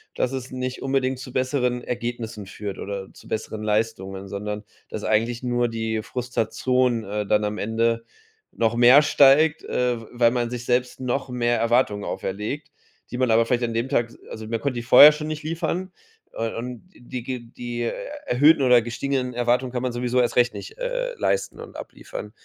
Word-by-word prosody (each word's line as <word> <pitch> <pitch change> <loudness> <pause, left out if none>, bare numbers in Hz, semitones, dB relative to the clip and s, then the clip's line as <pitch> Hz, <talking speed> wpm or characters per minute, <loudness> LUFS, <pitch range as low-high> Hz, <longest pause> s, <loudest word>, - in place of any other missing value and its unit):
dass 125 - 0
es 130 -1 -5
nicht 130 0 -4
unbedingt 135 -1 0
zu 130 -1 -9
besseren 125 -2 0
Ergebnissen 120 -3 -4
führt 100 +1 -6
oder 100 -1 -5
zu - - -16
besseren 110 0 -4
Leistungen, 100 -3 -1
sondern 105 +2 -5 0.3
dass 105 - -6
eigentlich 115 +3 0
nur 120 -1 +1
die 110 -1 -2
Frustration, 125 0 0
äh, 105 +1 -3
dann 105 +1 +2
am 105 0 -2
Ende 115 +2 0 0.5
noch 115 0 +1
mehr 125 +4 +8
steigt, 150 +2 +5
äh, 125 -1 0
w 115 - -11
weil 120 -1 +4
man 120 -1 -1
sich 125 0 -5
selbst 125 0 0
noch 130 +1 -2
mehr 120 -1 +1
Erwartungen 115 -3 +2
auferlegt, 105 +10 -4 0.4
die 125 - -4
man 125 -2 +2
aber 115 +1 +4
vielleicht 125 0 +1
an 115 -1 -1
dem 115 +3 -1
Tag, 120 -4 +2
s - - -16
also 110 0 -7
man 115 0 -2
konnte 140 -3 -1
die 120 - -3
vorher 130 +5 +10
schon 150 0 -5
nicht 155 -1 -4
liefern, 170 +3 -2 0.4
äh, 115 0 -3
und 125 +7 -6
die 120 0 -7
ge 125 0 -4
die 120 0 -6 0.5
erhöhten 145 +5 +5
oder 125 -2 +6
gestiegenen 125 +2 -2
Erwartungen 120 +1 +1
kann 125 - -1
man 130 - -1
sowieso 125 +1 +1
erst 120 - 0
recht 120 0 +4
nicht, 440 +3 -9
äh, - - -2
leisten - - -1
und - - -10
abliefern. - - -8
120 Hz, 185 wpm, -24 LUFS, 115-130 Hz, 0.5 s, vorher